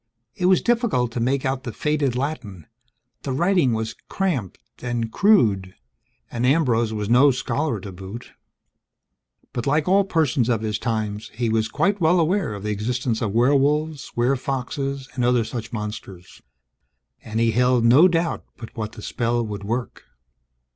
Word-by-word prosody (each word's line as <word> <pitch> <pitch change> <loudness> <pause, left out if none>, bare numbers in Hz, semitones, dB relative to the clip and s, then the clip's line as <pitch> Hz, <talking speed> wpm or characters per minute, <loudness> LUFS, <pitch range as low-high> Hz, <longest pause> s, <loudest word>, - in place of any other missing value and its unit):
It 180 - 0
was 185 0 +4
difficult 230 - +1
to 120 - -4
make 130 +3 0
out 130 0 -1
the - - -5
faded 150 -4 0
Latin; 125 - -4 0.6
the 135 - -4
writing 170 -1 +2
was 110 -1 -2 0.2
cramped 155 - -2 0.2
and 120 -2 -2
crude, 105 - +3 0.6
and 120 - -3
Ambrose 125 -5 +2
was 105 -2 -3
no 125 +5 +6
scholar 125 0 -1
to 100 - -8
boot. 95 +5 -9 1.2
But 120 - -3
like 150 +3 +1
all 195 +2 +4
persons 155 - +1
of 115 -3 +1
his 105 0 -2
times, 110 -3 -3
he 120 0 -1
was 110 0 +1
quite 200 - 0
well 170 +2 +4
aware 170 - 0
of 100 - -8
the 105 - -2
existence 115 +2 -2
of 110 -4 -1
werewolves, 145 +4 +1
werefoxes, 135 +2 -1
and 125 -1 -2
other 125 -1 +3
such 115 0 -6
monsters; 105 -5 -7 0.8
and 110 0 -3
he 115 0 +3
held 125 0 +2
no 135 +10 +7
doubt 170 -1 -1
but 115 - -10
what 110 -1 -4
the 105 - -10
spell 120 0 -1
would 105 -2 -6
work. 120 +4 -4
125 Hz, 160 wpm, -23 LUFS, 110-145 Hz, 1.2 s, no